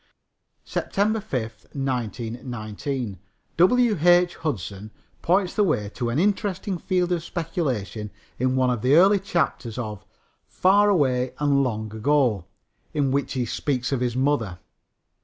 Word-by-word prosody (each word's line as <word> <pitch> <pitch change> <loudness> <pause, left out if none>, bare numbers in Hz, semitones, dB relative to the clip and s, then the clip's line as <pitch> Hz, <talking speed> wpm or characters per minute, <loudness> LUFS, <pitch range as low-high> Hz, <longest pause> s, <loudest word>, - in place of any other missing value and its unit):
SEPTEMBER 215 +2 -1
5, 115 - -5
1919. 120 - -4 0.4
W. 220 +5 +4
H. 175 +1 +5
Hudson 105 - -4 0.3
points 185 +1 +2
the 210 - +2
way 110 - 0
to 120 -2 -2
an 120 - -1
interesting 195 0 0
field 180 0 0
of 170 -2 0
speculation 130 - -3 0.3
in 130 +1 +1
one 130 -1 +2
of 120 -3 -2
the 130 +4 +4
early 195 +4 +6
chapters 160 - -2
of 105 -5 -5 0.4
Far 200 +3 +4
Away 130 -9 +1
and 140 -1 +2
Long 110 -3 -3
Ago, 115 - +2 0.5
in 140 -3 +1
which 140 +1 -1
he 125 -3 -1
speaks 130 +2 -2
of 135 - +1
his 125 -1 -1
mother. 130 -9 0
135 Hz, 135 wpm, -24 LUFS, 115-175 Hz, 0.5 s, early